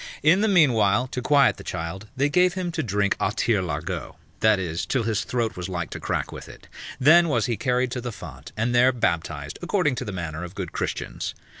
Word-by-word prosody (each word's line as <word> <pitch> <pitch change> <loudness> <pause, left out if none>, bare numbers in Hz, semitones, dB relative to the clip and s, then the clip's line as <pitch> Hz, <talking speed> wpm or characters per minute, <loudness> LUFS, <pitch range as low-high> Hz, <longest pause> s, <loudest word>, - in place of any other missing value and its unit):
In 170 +6 +5
the 220 - +3
meanwhile, 125 - +4
to 125 - -4
quiet 140 +2 +4
the - - -10
child, 90 +6 -5
they 140 +2 +3
gave 180 +4 +3
him 180 -2 -2
to - - -2
drink 100 -2 0
a - - +1
tirelaregot, 100 -6 -2 0.2
that 110 -1 +4
is, 85 -3 -3
till 130 -4 0
his 110 -2 0
throat 115 -3 -2
was 90 +1 -5
like 85 -3 -4
to - - -5
crack - - -2
with - - -9
it; - - -14 0.3
then 170 +6 +6
was 120 -7 +1
he 120 -2 0
carried 125 +3 0
to 125 - -3
the 120 0 -4
font, 75 - -10
and 115 +3 0
there 125 +2 +5
baptized, 80 - -2
according 175 -5 +1
to - - -4
the 105 - -5
manner 85 -3 -5
of 90 +1 -8
good 95 -4 -5
Christians. - - -4
115 Hz, 215 wpm, -24 LUFS, 95-135 Hz, 0.3 s, then